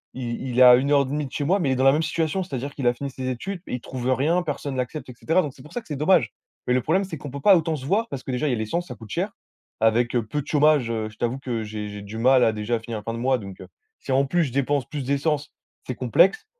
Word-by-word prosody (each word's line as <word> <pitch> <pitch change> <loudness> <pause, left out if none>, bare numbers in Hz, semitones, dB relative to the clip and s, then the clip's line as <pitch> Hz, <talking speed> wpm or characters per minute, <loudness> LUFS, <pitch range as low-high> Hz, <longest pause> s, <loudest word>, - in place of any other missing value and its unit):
il 120 -2 -4
il 125 -1 -1
est - - +6
à 125 -1 +10
1 135 +3 0
heure 145 -1 +5
et - - 0
demie 145 +3 -2
de 130 - -9
chez 145 - -2
moi, 185 +8 +2
mais 155 -7 0
il - - +2
est - - 0
dans 130 - 0
la 135 - +7
même 155 +3 +1
situation, 160 +3 -1
c'est-à-dire 140 -4 -5
qu'il 135 -4 -2
a 120 - +4
fini 140 +3 -5
ses 130 -1 -6
études 175 +9 -4
mais - - -5
il 125 - -6
trouve 125 -1 -5
rien, 160 +7 +1
personne 145 -3 -4
l'accepte, 130 +3 -4
et - - -8
cetera. 165 +4 +2
Donc 145 -6 -5
c'est 130 - -15
pour 150 - -14
ça 245 - -3
que - - -23
c'est 150 - -4
dommage. 150 - +3 0.4
Mais 125 - +3
le 130 - +2
problème, 190 +10 +1
c'est 185 -4 -6
qu'on 145 - -8
peut 140 +1 -6
pas 195 +4 +7
autant 160 -1 -1
se 135 -3 -7
voir 210 +9 +1
parce 135 -2 -6
que - - -4
déjà 125 +4 -1
il - - +1
y - - +1
a - - -1
l'essence, 165 +12 -2
ça 125 - -7
coûte 110 -2 -13
cher. 185 - -2 0.5
Avec, 115 +2 +2
heu, 120 -2 +1
peu 145 +7 -2
de 140 - -14
chômage, 150 -4 +3
heu, 110 -1 -2
je 105 - -18
t'avoue 120 +2 -1
que 120 -4 -3
j'ai 105 -1 -5
j'ai 105 0 -7
du 105 +2 -8
mal 130 +1 +5
à 110 - +3
déjà 110 +2 -1
finir 115 0 -6
la - - -13
fin 115 - -4
de - - -4
mois 130 +2 +2
donc 100 -3 -9
heu, - - -10 0.3
si - - -6
en 135 +1 +3
plus 170 +5 +1
je 135 - -5
dépense 140 0 +1
plus 150 -4 -5
d'essence, 145 +2 -1 0.4
c'est - - -3
complexe. 440 0 +3
135 Hz, 325 wpm, -24 LUFS, 120-150 Hz, 0.5 s, à